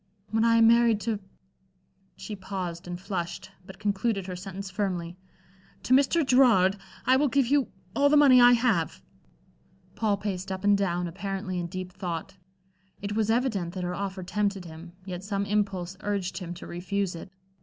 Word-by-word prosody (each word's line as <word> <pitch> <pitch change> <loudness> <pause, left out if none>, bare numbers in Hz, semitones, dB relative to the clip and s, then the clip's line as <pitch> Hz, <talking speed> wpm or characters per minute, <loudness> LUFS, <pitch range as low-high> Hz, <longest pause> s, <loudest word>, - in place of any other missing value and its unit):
When 220 0 +2
I 230 0 +4
am 225 0 +6
married 230 -2 +5
to" 220 -2 -1 1.0
she 215 - -6
paused 185 -3 -5
and 175 0 -5
flushed, 175 -3 -5
but 190 +1 -12
concluded 200 0 -1
her 185 -1 -5
sentence 195 +1 -7
firmly 180 -4 -2 0.7
"to 255 - +1
Mr. 280 +4 +4
Gerard, 230 -8 +5 0.3
I 260 +1 +5
will 290 +2 +3
give 275 0 +2
you 275 0 +2 0.3
all 285 0 +4
the 300 - +5
money 265 -4 +7
I 245 0 +8
have." 230 - +1 0.9
Paul 210 -3 0
paced 195 -2 -4
up 190 0 -4
and 205 0 +5
down, 180 -3 0
apparently 190 +1 -4
in 175 - -3
deep 185 +1 -6
thought. 180 +1 -5 0.6
It 205 +1 -4
was 220 -1 +1
evident 225 -8 0
that 185 - -3
her 180 0 -2
offer 195 0 -4
tempted 200 0 -1
him, 165 +1 -10
yet 180 -1 -6
some 200 0 -2
impulse 195 -3 -1
urged 200 -2 -2
him 175 -2 -6
to - - -10
refuse 185 +2 -2
it. 170 +3 -9
195 Hz, 175 wpm, -27 LUFS, 180-225 Hz, 1.0 s, I